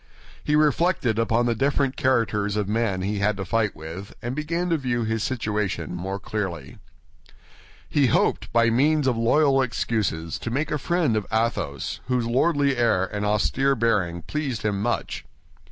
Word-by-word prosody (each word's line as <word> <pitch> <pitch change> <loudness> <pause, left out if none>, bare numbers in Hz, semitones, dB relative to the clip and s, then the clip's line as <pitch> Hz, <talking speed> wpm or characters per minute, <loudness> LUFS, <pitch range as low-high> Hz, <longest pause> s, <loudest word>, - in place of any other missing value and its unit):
He 150 - +1
reflected 150 - +2
upon 115 +1 +2
the 120 - +2
different 135 +2 0
characters 110 -5 +1
of 105 -1 0
those 105 - -3
with 115 +1 +2
whom 95 -4 -2
he 105 +2 -1
was - - -3
going 105 +1 +2
to 95 -1 -5
fight, 105 +2 +1 0.5
and 120 +2 -3
began 165 +4 -2
to 165 - +3
view 120 -4 -1
his 110 0 -1
situation 105 - -2
more 95 +3 -4
clearly. 90 -10 -5 1.1
He 145 -3 +2
hoped, - - +1
by 115 0 +3
means 145 +5 +3
of 130 -2 +2
loyal 135 +4 +3
excuses, 105 -10 -2
to - - -4
make 140 +6 -2
a 150 - 0
friend 165 -5 +1
of 105 -2 -2
Athos, 110 - -1
whose 125 -2 0
lordly 140 +2 +2
air 110 -6 +2
and 105 +2 -4
austere 115 +7 +2
bearing 100 -8 0
pleased 140 -7 -3
him 100 -2 -1
much. 120 +3 -2
115 Hz, 170 wpm, -24 LUFS, 105-135 Hz, 1.1 s, to